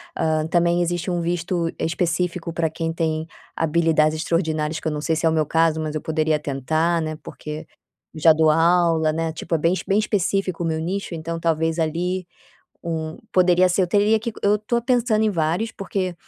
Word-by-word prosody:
Ah, 155 -1 0
também 175 0 +2
existe 175 +1 -1
um 175 -1 -1
visto 170 0 -1
específico 170 0 -1
para 165 -1 0
quem 165 +1 -3
tem 160 -1 -1 0.3
habilidades 160 -1 +2
extraordinárias, 155 -2 -1
que - - -5
eu - - 0
não 150 0 -3
sei 160 +2 0
se 160 - -1
é - - +5
o - - +1
meu 155 -1 +2
caso, 160 +1 +2
mas 155 -1 -3
eu 155 - -2
poderia 155 -1 0
tentar, 155 +4 0
né, 155 -1 -4
porque 155 +1 -7 0.5
já 160 +1 +6
dou 155 0 +3
aula, 165 0 +3
né? 165 0 -1
Tipo, 160 - -6
é - - +2
bem 165 +3 +2
bem 200 +2 +3
específico 195 -3 0
o - - -1
meu 160 -1 -1
nicho, 185 +3 -3
então 165 +1 -4
talvez 165 0 0
ali 175 +3 -1 0.6
um 160 -1 -3 0.2
poderia 180 0 +4
ser. 180 +2 +2
Eu - - +2
teria 210 +3 +3
que 230 +1 -4
eu 205 +1 +4
tô 235 +3 -1
pensando 235 -3 +1
em 215 - +2
vários, 170 +6 -1
porque, 190 -2 -3
165 Hz, 195 wpm, -22 LUFS, 160-180 Hz, 0.6 s, já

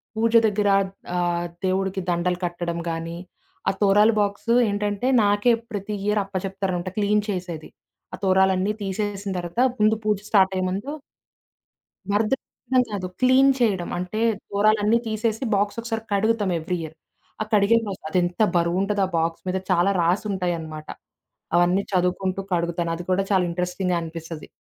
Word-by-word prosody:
పూజ 225 +1 +1
దెగ్గర 210 -1 +1 0.5
ఆహ్, 175 -1 0 0.2
దేవుడికి 190 +1 0
దండలు 175 +1 0
కట్టడం 170 -1 -3
గానీ. 165 +1 -4 0.5
ఆ - - +3
తోరాలు 210 +2 +5
బాక్సు 205 +3 0 0.2
ఏంటంటే 205 +3 -1 0.2
నాకే 205 +4 +3 0.2
ప్రతి 205 0 -4
ఇయర్ 210 0 +2
అప్ప 195 0 -16
జెప్తారంట. 190 -2 -3
క్లీన్ 210 0 +2
చేసేది. 180 -5 -4 0.4
ఆ - - -2
తొరాలన్నీ 190 +1 +3
తీసేసిన 200 0 -3
తర్వాత 175 +7 -2 0.2
ముందు 215 +1 +4
పూజ 210 -1 +1
స్టార్టయ్యే 190 -2 +3
ముందు 200 +9 -3 1.2
భద్రపెట్టడం 250 +3 0
కాదు. 190 -3 -3
క్లీన్ 260 +2 +6
చేయడం. 195 -7 +1
అంటే 200 +5 -3 0.3
తోరాలన్నీ 215 +2 +3
తీసేసి 220 +2 -1
బాక్స్ 205 +2 0
ఒకసారి 225 -1 -4
కడుగుతాం 210 -1 +1
ఎవ్రి 180 +3 -2
ఇయర్. 160 0 -8 0.5
ఆ - - +2
కడిగే 210 +2 +5 0.3
అదెంత 175 +2 0
బరువుంటది 190 +4 +1
ఆ - - -11
బాక్స్ 165 0 -1
మీద 185 - 0
చాలా 175 +3 +3
రాసుంటాయన్నమాట. 170 -4 -1 0.7
అవన్నీ 180 +3 +3
చదువుకుంటూ 185 +1 0
కడుగుతాను. 170 -1 0
అది 175 - -7
కూడా 190 +2 +2
చాలా 185 -2 +3
ఇంట్రెస్టింగ్‌గా 180 +1 -1
అనిపిస్తది. 165 -1 -7
195 Hz, 135 wpm, -23 LUFS, 175-210 Hz, 1.2 s, క్లీన్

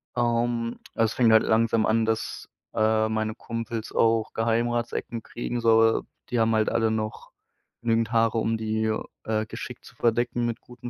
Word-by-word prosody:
Ähm, 120 -1 0 0.2
es 115 -1 +2
fängt 120 -3 +4
halt 110 0 +6
langsam 115 0 +2
an, 110 +1 +2
dass, 110 0 -3 0.2
äh, 110 0 +2
meine 110 0 -1
Kumpels 115 -1 -5
auch 115 -1 +2
Geheimratsecken 115 0 -1
kriegen. 120 0 -4
So 115 -1 +4 0.3
die 120 - 0
haben 115 0 +3
halt 110 -1 +2
alle 115 -1 +1
noch 110 -1 -4 0.5
genügend 115 -1 +1
Haare, 115 -1 +2
um 115 0 +1
die, 110 0 -1 0.3
äh, 110 -1 -1
geschickt - - -8
zu - - -15
verdecken 120 +1 +1
mit 120 0 -2
guten. 125 0 -10
115 Hz, 160 wpm, -26 LUFS, 110-115 Hz, 0.5 s, halt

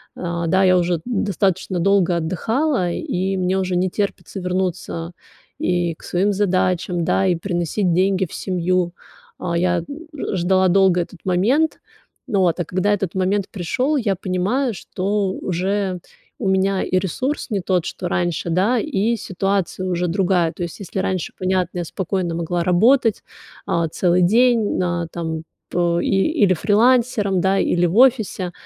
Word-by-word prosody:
Э, 170 -1 -3
да, 190 +3 +3
я 185 -1 +5
уже 175 -1 0
достаточно 195 -5 -1
долго 185 -1 +3
отдыхала, 190 - 0
и 195 - -2
мне 185 +1 0
уже 185 -1 -1
не 180 +1 +1
терпится 195 -1 -3
вернуться 180 -2 -3 0.5
и 175 -1 0
к - - -20
своим 195 +3 0
задачам, 185 -3 0
да, 190 - +2
и 180 - +2
приносить 175 +1 -1
деньги 190 +2 +2
в - - -14
семью. 180 -1 -1 0.4
А 170 -1 -3
я 175 +1 +2
н 170 - -3 0.3
ж 265 -8 -3
ждала 185 +1 +3
долго 190 -1 +4
этот 175 +1 -8
момент. 230 - +1 0.5
Вот, 190 -7 +1
а 175 - -1
когда 185 +5 0
этот 195 -3 -2
момент 190 +1 0
пришёл, 250 - -1
я 215 -7 0
понимаю, 195 +8 -1
что 195 +2 -2
уже 190 +1 -2 0.4
у 210 - -2
меня 190 0 +1
и 185 - 0
ресурс 255 - -3
не 205 -4 -1
тот, 180 -2 0
что 180 - -4
раньше, 175 -1 -1
да, 195 +9 +2
и 235 -4 0
ситуация 195 -1 -2
уже 180 0 0
другая. 175 -2 +1
То 175 - -5
есть, 170 - -6
если 195 -1 -5
раньше, 185 -2 -2
понятно, 185 -1 -1
я - - -1
спокойно 180 0 -2
могла 170 +1 -1
работать, 225 +6 +3 0.4
а, 170 -1 0
целый 180 +2 +2
день, 230 +3 +3
а, 175 -1 -1
там, 160 -2 -4 0.3
по 170 -1 +1
и - - -1 0.4
или 185 - +3
фрилансером, 210 -1 +2
да, 190 +1 +2
или 175 -1 +2
в 175 +5 -2
офисе, 230 -8 +3
185 Hz, 160 wpm, -20 LUFS, 175-200 Hz, 0.5 s, я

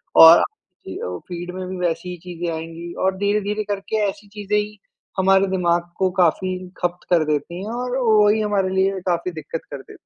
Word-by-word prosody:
और 165 +1 +10
अ, - - +2
की 185 - -9
औ 90 0 -4
फीड 175 0 -6
में 185 0 -5
भी 185 0 -5
वैसी 165 +2 -3
ही 180 - -6
चीज़ें 175 -1 -4
आएँगी 165 +1 -7
और 190 0 +1
धीरे-धीरे 205 +1 0
करके 200 +2 -3
ऐसी 205 +1 -9
चीज़ें 205 0 -2
ही 210 0 -2 0.4
हमारे 195 +1 +4
दिमाग 175 -2 0
को 190 -1 +2
काफ़ी 185 +1 +2 0.3
खप्त 175 0 -3
कर 170 -3 +4
देती 155 +4 -2
हैं 215 - -5
और 250 +1 -2
वही 215 -3 +4
हमारे 205 -3 +1
लिए 190 0 +2
काफ़ी 175 0 0
दिक्कत 160 0 -6
कर 140 - -4
देती। - - -16
185 Hz, 195 wpm, -21 LUFS, 170-205 Hz, 0.4 s, और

